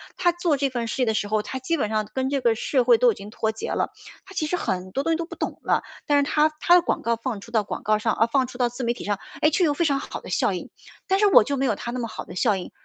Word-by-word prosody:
她 350 - +3
做 345 -4 0
这 275 0 +1
份 235 -2 -2
事 255 - -1
业 - - +3
的 220 - +1
时 215 -1 -1
候， 215 0 0
她 265 - -5
基 295 +6 -1
本 215 - 0
上 215 -1 -1
跟 260 0 0
这 275 - 0
个 235 -2 +3
社 255 +3 +1
会 240 -1 +5
都 245 +1 +5
已 - - -5
经 200 +1 -10
脱 220 0 -1
节 220 - -6
了， - - -1 0.3
她 390 - -13
其 310 -5 -1
实 360 - 0
很 185 - -3
多 270 +8 -1
东 330 +2 +1
西 - - 0
都 335 - -3
不 - - -9
懂 - - -4
了。 - - +1 0.2
但 290 - +4
是 285 - +4
她 300 +2 +3
她 345 - +4
的 355 - +7
广 - - -1
告 235 0 +1
放 230 -1 -4
出 230 - -12
到 220 -3 +2
广 - - -6
告 215 0 +2
上 220 +1 +1
啊， 225 - +3
放 255 +2 +1
出 245 - -10
到 245 -1 +2
自 245 +2 -6
媒 235 0 +1
体 - - -8
上， 205 -1 -1 0.2
诶， 305 - +5
就、 - - +1
却 360 - +4
有 295 - +2
非 340 - +1
常 280 -3 +2
好 - - -6
的 - - -11
效 - - +1
应。 - - -6 0.4
但 385 0 +2
是 420 - +5
我 380 - +7
就 280 +3 -2
没 270 - +1
有 215 - +1
她 235 - -5
那 250 - -4
么 235 - -2
好 - - -7
的 - - -10
效 215 +1 +2
应， 185 - -6
250 Hz, 370 characters per minute, -24 LUFS, 220-290 Hz, 0.4 s, 的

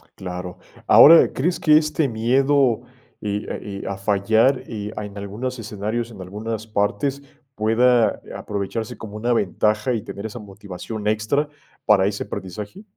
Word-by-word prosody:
Claro, 90 -1 -7 0.3
ahora, 165 +2 +8
¿crees 170 +7 0
que 155 -1 +6
este 155 -1 +1
miedo 130 +2 +2 0.4
e 105 0 -3
a - - -3
e 100 - -7
a 100 - -3
fallar, 110 +6 +2
eh, 105 -2 -5
a 105 - -3
en 100 0 -10
algunos 110 +6 -5
escenarios, 110 +2 -4
en 100 -4 -10
algunas 110 +4 -5
partes, 110 +7 -1 0.3
pueda, 115 +2 +3
eh, - - -10
aprovecharse 105 +2 -4
como 105 -1 -9
una 120 +3 -1
ventaja 110 +2 +1
y 110 - -1
tener 100 - -7
esa 110 +2 -6
motivación 105 +1 -7
extra 110 +8 +1 0.4
para 100 -3 +5
ese 100 0 -2
aprendizaje? 105 - -7
110 Hz, 155 wpm, -22 LUFS, 100-125 Hz, 0.4 s, ahora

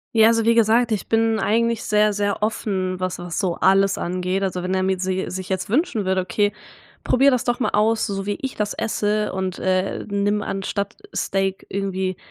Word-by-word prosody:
Ja, 220 0 +7
also, 230 0 +3
wie 230 +1 +3
gesagt, 230 +1 +3
ich 215 - -1
bin 225 0 +2
eigentlich 230 +1 +1
sehr, 210 0 +3
sehr 205 0 -1
offen, 190 -4 -1
was 185 0 -2
was 175 -1 -5
so 180 -3 0
alles 195 0 +3
angeht. 185 +2 -2
Also, 185 -2 -2
wenn 185 +1 -2
er 185 0 +1
mir 190 -1 0
sie 185 0 -2
sich 185 0 -5
jetzt 190 -1 -3
wünschen 250 - +1
würde, 190 0 +1
„Okay, 205 +3 0 0.5
probier 275 +2 +4
das 250 -2 0
doch 240 +1 0
mal - - +2
aus, 220 +2 +2
so 195 -2 -3
wie 205 0 -2
ich 265 -1 -4
das 210 -1 -1
esse 210 -1 -1
und, 190 -1 -3
äh, 185 +1 0
nimm 205 +1 0
anstatt 200 0 -3 0.2
Steak 195 0 -1
irgendwie 190 -1 -2
200 Hz, 200 wpm, -22 LUFS, 190-220 Hz, 0.5 s, Ja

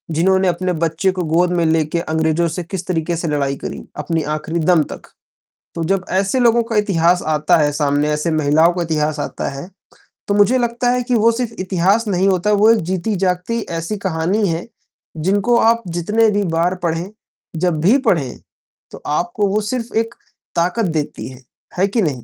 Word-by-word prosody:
जिन्होंने 190 +3 +3
अपने 180 +1 0
बच्चे 165 +4 0
को 185 -1 -3
गोद 180 +1 +3
में 170 - +2
लेके 160 +1 +1
अंग्रेजों 160 +1 0
से 170 +2 -4
किस 185 +1 -6
तरीके 170 -1 -1
से 170 - -3
लड़ाई 140 -2 0
करी, - - -6
अपनी 160 +1 -1
आखिरी 160 +2 -3
दम 160 -1 +3
तक। - - -10 0.6
तो 165 - -2
जब 190 +1 0
ऐसे 195 +6 +1
लोगों 235 -1 +4
का 230 0 -5
इतिहास 180 -4 +2
आता 155 +3 +2
है 150 -2 +2
सामने, 145 0 +1
ऐसे 150 +2 -1
महिलाओं 155 +3 +3
का 175 - -2
इतिहास 155 -2 -1
आता - - -3
है, 140 +6 -8 0.6
तो 200 - +1
मुझे 205 +5 +4
लगता 240 0 0
है 250 0 0
कि 245 0 0
वो 230 +1 +4
सिर्फ़ 230 -1 -3
इतिहास 190 +4 +1
नहीं 190 -1 +1
होता, 195 +2 +1
वो 210 +2 +5
एक 230 - +3
जीती 190 +3 -1
जागती 185 +5 -1 0.2
ऐसी 165 +6 -3
कहानी 190 +2 0
है, 165 +4 -3 0.5
जिनको 200 +8 +2
आप 230 +1 +3
जितने 210 +7 +1
भी 205 0 0
बार 175 +3 +1
पढ़ें, 170 +2 -1 0.5
जब 165 -2 0
भी 210 +10 +5
पढ़ें, 150 - +1 0.5
तो - - -11
आपको 175 +7 0
वो 205 +2 0
सिर्फ़ 240 0 -3
एक 225 +1 0 0.4
ताकत 180 +7 +1
देती 155 -4 -3
है, 130 0 -13 0.4
है 195 +2 +3
कि 220 +2 0
नहीं? 135 - -2
180 Hz, 190 wpm, -18 LUFS, 160-205 Hz, 0.6 s, वो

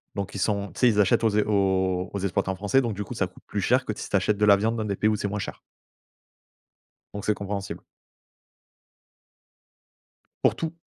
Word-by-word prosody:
donc 100 0 -4
ils 100 - -3
sont 100 +1 0
tu - - -10
sais, 125 - +7
ils 105 -2 +3
achètent 100 +3 +3
aux 115 - +4
ex 105 - +2
aux 95 -2 +1
aux 100 - -2
exploitants 95 0 -1
français, 100 +7 +2
donc 120 -4 -2
du 105 - -3
coup, 125 - -8
ça 100 - +1
coûte 90 - -19
plus 105 - -2
cher 125 +6 +2
que 110 - -2
si - - -6
tu - - 0
achètes 100 +1 +2
de 105 - +3
la 100 -1 +7
viande 110 +3 0
dans 110 - -2
des 100 -2 -1
pays 105 - +2
où 110 - +2
c'est 100 - -2
moins 105 +1 -3
cher. 95 - -6 1.5
Donc 100 -1 -5
c'est 105 - +3
compréhensible. 100 -1 -5 2.6
Pour - - +4
tout. 165 -1 -3
100 Hz, 215 wpm, -26 LUFS, 95-105 Hz, 2.6 s, sais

